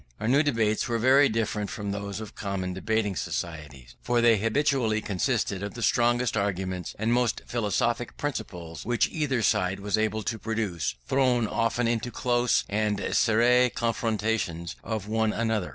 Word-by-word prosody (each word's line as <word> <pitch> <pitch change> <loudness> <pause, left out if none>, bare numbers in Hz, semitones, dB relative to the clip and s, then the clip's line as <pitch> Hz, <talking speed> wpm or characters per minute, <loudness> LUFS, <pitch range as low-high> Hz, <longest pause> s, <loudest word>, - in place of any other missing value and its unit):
Our 130 +6 +3
debates 115 -8 +1
were 120 -2 0
very 135 +4 +5
different 105 -2 -1
from 100 -4 -4
those 100 0 -4
of 110 -2 -8
common 95 -2 -3
debating 105 +1 -1
societies, 70 -9 -5
for 120 -1 +1
they 115 -1 +5
habitually 115 -1 +1
consisted 105 -1 -1
of 100 +3 -5
the 115 - -5
strongest 120 +1 +2
arguments 95 -3 -2
and 110 +3 +1
most 120 -2 +1
philosophic 120 +1 -1
principles 90 - -5
which 120 0 +1
either 135 -7 -1
side 95 -4 +1
was 105 +2 0
able 110 0 0
to 110 - -3
produce, 105 -7 -2
thrown 125 -3 +2
often 115 +2 0
into 120 +1 -1
close 120 0 +1
and 105 0 0
serré 120 +4 +3
confutations 110 -7 -1
of 110 -3 -4
one 110 0 +1
another. 110 -6 -1
110 Hz, 150 wpm, -27 LUFS, 100-120 Hz, -, very